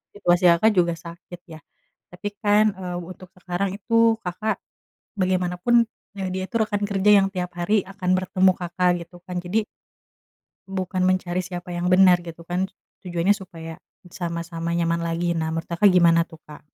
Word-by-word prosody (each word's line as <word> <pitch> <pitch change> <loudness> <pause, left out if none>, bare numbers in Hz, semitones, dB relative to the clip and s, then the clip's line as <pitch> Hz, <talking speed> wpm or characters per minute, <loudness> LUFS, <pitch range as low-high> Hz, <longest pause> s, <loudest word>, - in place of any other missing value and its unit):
situasi 175 -3 +2
Kakak 190 +7 +4
juga 170 -2 +3
sakit 170 +1 -11
ya, 160 -2 -10 0.5
tapi 180 +4 -5
kan, 210 0 +4
eee, 180 -2 -5
untuk 185 +1 -11
sekarang 185 +2 -3
itu, 230 +1 +3
Kakak, 200 +5 -2 0.6
bagaimanapun, 185 +5 +2 0.4
eee, 190 -1 -2
dia 190 0 -2
itu, - - -11
rekan 210 -1 -1
kerja 200 0 +3
yang - - +1
tiap 180 -1 -3
hari 195 +3 +1
akan 190 -2 -3
bertemu 185 0 +3
Kakak, 180 0 +1
gitu 175 - -16
kan. 180 - -6
Jadi 210 +5 0 1.0
bukan 185 -1 -2
mencari 185 -1 +1
siapa 175 0 -6
yang 175 +1 -1
benar, 180 -1 +6
gitu 170 0 -10
kan, 185 +2 -2 0.3
tujuannya 180 +2 +1
supaya, 165 -5 -9 0.3
sama-sama 170 -2 -4
nyaman 170 0 0
lagi. 170 +1 -1
Nah, 160 -1 -1
menurut 165 0 -4
Kak 170 +3 -5
gimana 170 -2 +5
tuh, 165 -1 -15
Kak? 150 -1 -12
180 Hz, 160 wpm, -23 LUFS, 170-190 Hz, 1.0 s, benar